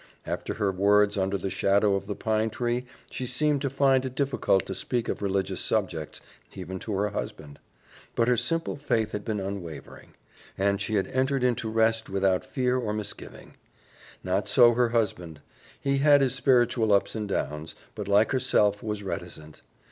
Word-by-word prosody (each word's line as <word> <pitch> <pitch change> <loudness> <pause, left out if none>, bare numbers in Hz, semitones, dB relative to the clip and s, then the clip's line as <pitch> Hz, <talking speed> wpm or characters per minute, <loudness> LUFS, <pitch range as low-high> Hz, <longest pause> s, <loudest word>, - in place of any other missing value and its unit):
After - - -4
her 100 -3 0
words 100 +2 +3
under 95 0 0
the 95 +1 -4
shadow 100 +1 +2
of 100 0 -2
the 105 - -3
pine 110 +1 0
tree 120 +2 -2 0.2
she 130 - -4
seemed 145 +3 +1
to 140 - -1
find 135 -1 +3
it 130 -1 -5
difficult 135 -8 +1
to - - -5
speak 120 -2 -2
of - - -3
religious 95 -1 -1
subjects, 90 -8 -2 0.3
even 95 0 -6
to 105 - -5
her 105 +2 0
husband; 75 -7 -7 0.6
but 115 - +2
her 125 - +4
simple 165 +7 -1
faith 115 -7 -1
had 105 - -4
been 105 -1 -2
unwavering, 95 -4 -7 0.4
and 100 +1 +1
she 110 +2 -2
had 95 - +1
entered 130 0 0
into 120 -3 0
rest 110 0 +1
without 95 -1 +1
fear 125 -1 0
or 110 -4 -2
misgiving. 105 -1 -8 0.7
Not 95 +2 -1
so 120 -1 +6
her 120 0 +2
husband. 90 -9 -2 0.4
He 140 0 0
had 145 0 +5
his 130 -2 +2
spiritual 120 -4 +2
ups 100 0 +2
and 105 -2 -4
downs, 75 -3 -3 0.2
but, - - -6
like 100 +2 +3
herself, 105 -6 +2
was 105 -2 -4
reticent. 80 -5 -7
105 Hz, 175 wpm, -27 LUFS, 100-125 Hz, 0.7 s, so